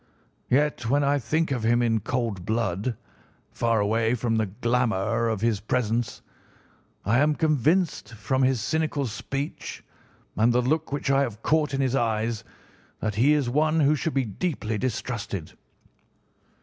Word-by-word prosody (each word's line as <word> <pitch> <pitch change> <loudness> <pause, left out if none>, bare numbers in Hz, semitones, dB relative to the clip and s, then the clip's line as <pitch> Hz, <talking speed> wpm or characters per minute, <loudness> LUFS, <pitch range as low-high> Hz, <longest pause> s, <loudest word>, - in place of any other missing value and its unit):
Yet 130 -3 +1
when 145 +2 +3
I 140 +1 +2
think 155 +6 0
of 125 -3 -1
him 120 +2 +3
in 115 -2 +2
cold 115 -4 -2
blood, 110 +1 -1 0.5
far 115 -2 +1
away 110 +3 +1
from 115 -1 0
the 110 -1 +1
glamour 115 0 0
of 110 -3 -2
his 115 -3 +1
presence, 115 +1 -1 0.8
I 115 +6 +3
am 150 +1 +3
convinced 155 -2 +1
from 130 +5 -1
his 130 -2 +3
cynical 155 0 0
speech 135 +5 -5 0.5
and 115 +3 +3
the 125 - +3
look 155 +5 0
which 145 0 -1
I 135 0 +4
have 115 -5 -3
caught 150 -3 +2
in 135 - 0
his 130 -2 +1
eyes 115 -2 0 0.6
that 105 -1 -2
he 125 +9 +4
is 145 -4 +1
one 155 +5 +2
who 145 +1 +4
should 150 +2 -2
be 135 -2 +2
deeply 110 - -3
distrusted. 110 -7 -3
120 Hz, 155 wpm, -26 LUFS, 110-140 Hz, 0.8 s, I